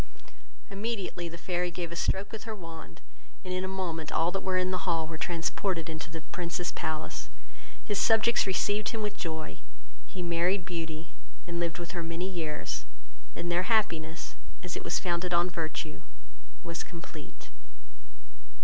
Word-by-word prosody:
Immediately 195 Hz, -4 st, -1 dB
the 170 Hz, -, -6 dB
fairy 180 Hz, +1 st, +1 dB
gave 175 Hz, -1 st, -3 dB
a -, -, -3 dB
stroke 190 Hz, +3 st, +2 dB
with 220 Hz, -1 st, -5 dB
her 220 Hz, -1 st, -2 dB
wand, 165 Hz, -7 st, -8 dB, 0.4 s
and 185 Hz, -, -1 dB
in 185 Hz, 0 st, +1 dB
a -, -, 0 dB
moment 175 Hz, -5 st, -1 dB
all 165 Hz, +2 st, +4 dB
that 195 Hz, +1 st, 0 dB
were 190 Hz, -1 st, +2 dB
in 185 Hz, 0 st, +3 dB
the 185 Hz, 0 st, +1 dB
hall 165 Hz, -2 st, +3 dB
were 160 Hz, +1 st, -4 dB
transported 170 Hz, +1 st, +1 dB
into 160 Hz, 0 st, -4 dB
the 165 Hz, 0 st, -4 dB
Prince's 175 Hz, 0 st, 0 dB
palace. 155 Hz, 0 st, -2 dB, 0.6 s
His 205 Hz, -3 st, +2 dB
subjects 225 Hz, 0 st, +6 dB
received 205 Hz, +2 st, +3 dB
him 225 Hz, -2 st, -1 dB
with 210 Hz, -1 st, 0 dB
joy; 160 Hz, -4 st, -3 dB, 0.5 s
he 180 Hz, +8 st, -4 dB
married 175 Hz, +2 st, +3 dB
Beauty, 165 Hz, -3 st, -3 dB, 0.4 s
and 170 Hz, 0 st, -2 dB
lived 170 Hz, -1 st, +1 dB
with 170 Hz, -1 st, -4 dB
her 175 Hz, -, -1 dB
many 165 Hz, +2 st, -1 dB
years; 165 Hz, -5 st, -1 dB, 0.5 s
and 175 Hz, -, -1 dB
their 180 Hz, +4 st, +3 dB
happiness, 170 Hz, -8 st, +2 dB, 0.3 s
as 180 Hz, -, -2 dB
it -, -, -3 dB
was -, -, +2 dB
founded 175 Hz, 0 st, +2 dB
on 175 Hz, +1 st, +5 dB
virtue, 160 Hz, -2 st, -2 dB, 0.6 s
was 170 Hz, 0 st, -2 dB
complete. 165 Hz, -7 st, -8 dB
175 Hz, 165 wpm, -31 LUFS, 165-190 Hz, 0.6 s, subjects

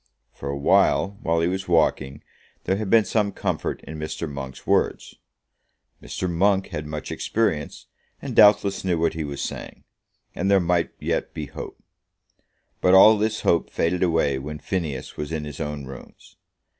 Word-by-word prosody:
For 70 Hz, -, -7 dB
a 70 Hz, -, -2 dB
while, 100 Hz, +7 st, +2 dB
while 80 Hz, 0 st, +1 dB
he 85 Hz, -, +2 dB
was 95 Hz, +1 st, -3 dB
walking, 80 Hz, -5 st, +1 dB, 0.4 s
there 95 Hz, -, 0 dB
had 105 Hz, -2 st, -3 dB
been 110 Hz, -1 st, +5 dB
some 105 Hz, -2 st, 0 dB
comfort -, -, -3 dB
in 80 Hz, 0 st, -8 dB
Mr. 80 Hz, +2 st, -4 dB
Monk's 70 Hz, -2 st, -8 dB
words. -, -, 0 dB, 0.9 s
Mr. 95 Hz, -, -4 dB
Monk 95 Hz, +3 st, +1 dB
had 75 Hz, 0 st, -5 dB
much 75 Hz, 0 st, -6 dB
experience, 80 Hz, -10 st, -2 dB, 0.3 s
and -, -, -6 dB
doubtless 105 Hz, -1 st, +5 dB
knew 90 Hz, -3 st, +1 dB
what 80 Hz, 0 st, +1 dB
he 80 Hz, -, -3 dB
was 70 Hz, -1 st, -5 dB
saying, -, -, -7 dB, 0.5 s
and 95 Hz, +3 st, -1 dB
there 100 Hz, -1 st, +5 dB
might 85 Hz, -1 st, +1 dB
yet -, -, -2 dB
be 75 Hz, -, -4 dB
hope. -, -, -9 dB, 1.0 s
But 90 Hz, +1 st, +5 dB
all 110 Hz, +3 st, +9 dB
this 110 Hz, +1 st, -1 dB
hope 85 Hz, -, +2 dB
faded 85 Hz, +2 st, -1 dB
away 80 Hz, -6 st, +2 dB
when 75 Hz, +3 st, -6 dB
Phineas 75 Hz, -6 st, -4 dB
was 75 Hz, +1 st, -5 dB
in 80 Hz, -2 st, -3 dB
his 75 Hz, -1 st, -8 dB
own 75 Hz, -2 st, -4 dB
rooms. 65 Hz, -1 st, -13 dB
85 Hz, 170 wpm, -24 LUFS, 75-95 Hz, 1.0 s, all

